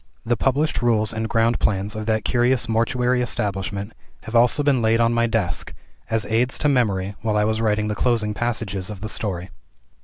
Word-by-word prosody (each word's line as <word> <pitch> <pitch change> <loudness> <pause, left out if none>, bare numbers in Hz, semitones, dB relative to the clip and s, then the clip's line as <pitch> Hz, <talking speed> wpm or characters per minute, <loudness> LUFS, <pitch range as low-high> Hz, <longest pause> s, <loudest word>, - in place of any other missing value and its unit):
The 120 +1 +2
published 140 +6 0
rules 115 -2 +1
and 110 0 -3
ground 115 +1 +2
plans 100 0 0
of 110 0 -5
that 110 -1 0
curious 120 -1 +2
mortuary 125 +2 +1
establishment 100 -2 -3 0.3
have 110 - -6
also 120 +5 +4
been 140 -4 +2
laid 115 +1 +2
on 115 0 +3
my 115 0 +2
desk, 100 -6 -2 0.3
as 110 -1 0
aids 120 +4 +1
to - - +1
memory 105 -8 +1
while 110 -2 0
I 105 - +3
was 110 +1 0
writing 105 -1 +1
the 105 - -1
closing 110 -1 0
passages 105 -4 -3
of 105 -3 -8
the 110 - -4
story. 95 -3 -3
110 Hz, 190 wpm, -22 LUFS, 105-120 Hz, 0.3 s, also